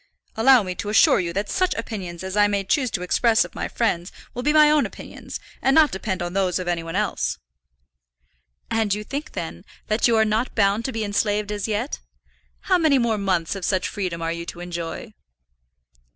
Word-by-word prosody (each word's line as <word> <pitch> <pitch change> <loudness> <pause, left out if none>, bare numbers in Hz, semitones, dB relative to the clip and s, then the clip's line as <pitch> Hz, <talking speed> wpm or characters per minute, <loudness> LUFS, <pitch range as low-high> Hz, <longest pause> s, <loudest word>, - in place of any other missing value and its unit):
"Allow 245 +1 +6
me 185 -1 -4
to 205 +3 -5
assure 215 - +5
you 170 -2 -2
that 200 +3 -2
such 370 -1 0
opinions 190 -6 -5
as 190 +1 -4
I 205 0 +5
may 200 -1 0
choose 255 +6 +1
to 180 -5 -3
express 225 +5 +3
of - - -12
my - - -3
friends 180 -6 -1 0.2
will 245 - -4
be 295 +4 +2
my 305 -1 +6
own 300 -2 +3
opinions, - - -9 0.2
and 270 - +3
not 315 -2 +6
depend 190 -1 -3
on 175 0 -4
those 190 -2 +1
of 185 -1 -5
any 175 -1 0
one 165 +1 -6
else." 205 - -1 1.3
"And 225 -2 +1
you 210 - -5
think, 285 +7 -6
then, - - -6 0.3
that 215 +3 +3
you 230 -1 +3
are 220 - +4
not 220 +4 -1
bound 205 +1 +2
to 265 - -1
be 225 -2 -3
enslaved 205 0 0
as 205 0 -3
yet? 220 +6 -2 0.6
How 370 -2 +2
many 310 -4 +4
more 235 -4 +1
months 185 -5 0
of 195 -2 -7
such 185 0 0
freedom 180 -4 -4
are 165 - -1
you 170 0 -5
to 175 - -7
enjoy?" 175 +4 -6
210 Hz, 210 wpm, -23 LUFS, 185-235 Hz, 1.3 s, Allow